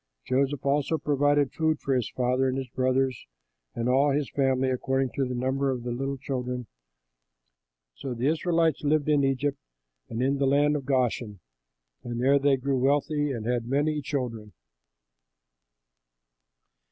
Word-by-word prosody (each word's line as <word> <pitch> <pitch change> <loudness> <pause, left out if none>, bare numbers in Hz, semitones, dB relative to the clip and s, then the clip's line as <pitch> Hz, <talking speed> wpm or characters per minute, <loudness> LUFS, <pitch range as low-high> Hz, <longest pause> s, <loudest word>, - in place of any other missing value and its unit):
Joseph 135 +1 0
also 145 +3 +1
provided 145 -1 +1
food 160 -1 0
for 135 - -1
his 125 -4 0
father 125 +1 0
and 130 - -2
his 130 -2 -4
brothers 130 0 0 0.5
and 115 +1 -2
all 135 +3 +3
his 145 0 -1
father's 135 -2 +1
family 130 0 +1
according 135 0 0
to 135 - -1
the 125 0 -4
number 130 +2 0
of 125 -2 -2
the 120 - -3
little 135 +3 -3
children. 125 -2 -4 1.3
So 125 - -6
the 120 +2 -2
Israelites 165 0 +1
lived 150 0 +1
in 145 -2 +3
Egypt, 135 +1 0 0.5
in 115 - -5 0.2
the 135 - +2
land 145 +2 +3
of 140 -3 -3
Goshen, 120 -6 0 0.6
and 120 -1 -4
there 135 +3 +4
they 140 -1 +3
grew 135 0 -1
wealthy 145 +2 +1
and 115 -4 -4
had 120 -1 -1
many 150 +3 0
children. 115 -8 -4
135 Hz, 155 wpm, -27 LUFS, 125-145 Hz, 1.3 s, there